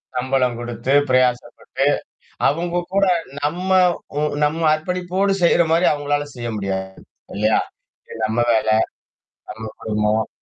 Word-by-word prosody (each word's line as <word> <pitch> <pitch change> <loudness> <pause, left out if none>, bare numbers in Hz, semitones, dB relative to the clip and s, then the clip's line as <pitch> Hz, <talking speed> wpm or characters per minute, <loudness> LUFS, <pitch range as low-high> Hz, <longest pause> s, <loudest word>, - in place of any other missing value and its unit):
சம்பளம் 125 -1 0
குடுத்து 120 +2 -3 0.2
பிரயாசப்பட்டு. 130 +1 0 0.6
அவுங்க 170 +4 -1 0.2
கூட 200 0 +4 0.4
நம்ம 180 +6 -2 0.5
உ - - +1 0.2
நம்ம 160 +2 0
அர்ப்பணிப்போடு 180 +4 -1
செய்றமாரி 170 0 +3
அவுங்களால 145 0 -1
செய்ய 120 -1 -5
முடியாது. 95 -1 -3 0.5
இல்லயா! 110 +2 +2 0.5
இது - - -9
நம்ம 110 +2 -1
வேல. 110 0 +1 0.8
நம்ம 110 +1 -9 0.2
குடும்பம். 105 0 0
130 Hz, 110 wpm, -20 LUFS, 110-165 Hz, 0.8 s, கூட